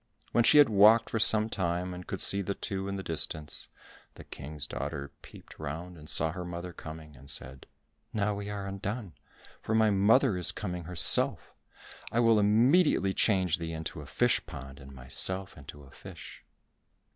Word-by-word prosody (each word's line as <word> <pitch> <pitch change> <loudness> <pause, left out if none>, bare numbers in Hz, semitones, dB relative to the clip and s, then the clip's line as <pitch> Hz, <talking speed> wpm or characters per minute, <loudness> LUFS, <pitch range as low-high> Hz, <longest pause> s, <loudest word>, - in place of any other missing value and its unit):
When 120 - +3
she 150 - +5
had 145 -2 +8
walked 110 +2 +5
for 115 - -1
some 110 0 +5
time, 90 -3 -3
and 90 0 -10
could - - -5
see 100 - +4
the 100 +1 -4
two 95 0 -5
in 100 - -4
the 95 - -6
distance, 80 -2 -4 0.5
the - - -12
King's 75 +1 -6
daughter 70 +2 -6
peeped - - -15
round 80 +4 -7
and 75 -2 -11
saw 80 +1 +5
her 90 +1 -6
mother 90 0 -7
coming, 80 -2 -11
and 70 +2 -15
said, 65 +1 -5 0.4
"Now 105 -1 -1
we 100 0 -6
are 100 -1 -5
undone, 100 0 -6 0.5
for 110 - -2
my 110 -1 +3
mother 105 +3 +3
is 90 - +2
coming 90 -5 -6
herself: 90 -2 +1 0.6
I 115 - 0
will 115 -2 +4
immediately 110 - +3
change 95 -5 +1
thee 85 0 -5
into 80 -1 -6
a 70 - -12
fish - - +1
pond 70 +1 -10
and 70 0 -13
myself 95 +9 +1
into 70 0 -12
a 70 - -17
fish. - - -12
90 Hz, 180 wpm, -29 LUFS, 80-105 Hz, 0.6 s, had